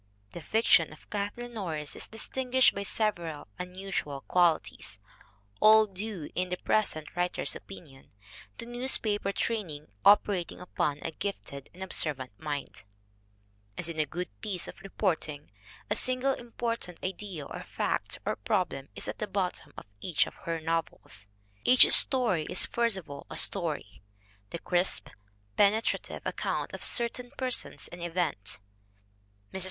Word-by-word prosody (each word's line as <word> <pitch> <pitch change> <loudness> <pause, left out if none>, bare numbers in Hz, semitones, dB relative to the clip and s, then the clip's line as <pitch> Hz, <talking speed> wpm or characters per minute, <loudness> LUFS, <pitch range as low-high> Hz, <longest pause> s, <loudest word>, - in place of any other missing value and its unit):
The 170 - -7
fiction 170 -3 +4
of 155 - -15
Kathleen 210 +4 -3
Norris 160 -9 -3
is - - -4
distin 250 +3 -4
guished 260 0 +6
by 200 - -3
several 175 -7 -1
unusual 180 -6 -4
qualities, 160 - +1 0.6
all 220 0 +8
due, 195 -4 -6
in 180 0 -1
the 180 - -2
present 165 -9 0
writer's 180 0 0
opinion, 150 -9 -12 0.5
to - - -6
newspaper 235 -5 +2
training 185 -10 -3
oper 205 -1 +6
ating 170 - -10
upon 150 -5 -1
a 165 - -3
gifted 145 -6 -6
and 185 +2 -8
observant 145 -8 +1
mind: 145 -2 -4 0.9
As 170 - 0
in 160 -2 -5
a 155 - +2
good 175 +4 -4
piece 185 -4 -3
of - - -10
reporting, 160 -7 -2 0.4
a 210 - 0
single 255 +4 +2
important 235 -7 -4
idea 185 -5 -5
or - - -7
fact - - -2
or - - -1
problem - - -1
is - - -3
at - - -5
the - - -2
bottom - - -2
of - - -8
each 175 - +2
of - - -9
her 165 -1 -1
novels. 160 -10 -3 0.4
Each 255 0 +8
story 220 - +6
is 180 - +2
first 235 -4 +1
of 185 - -8
all 140 0 -9
a - - -2
story, 160 - +1 0.5
the - - -4
crisp, 175 +2 +1 0.5
pene 205 +2 +5
trative - - -3
account - - -2
of - - -7
certain 245 +1 +1
persons 255 -2 -1
and 175 - -10
events. 170 - -1 0.9
Mrs. 190 - -3
180 Hz, 145 wpm, -30 LUFS, 155-215 Hz, 0.9 s, all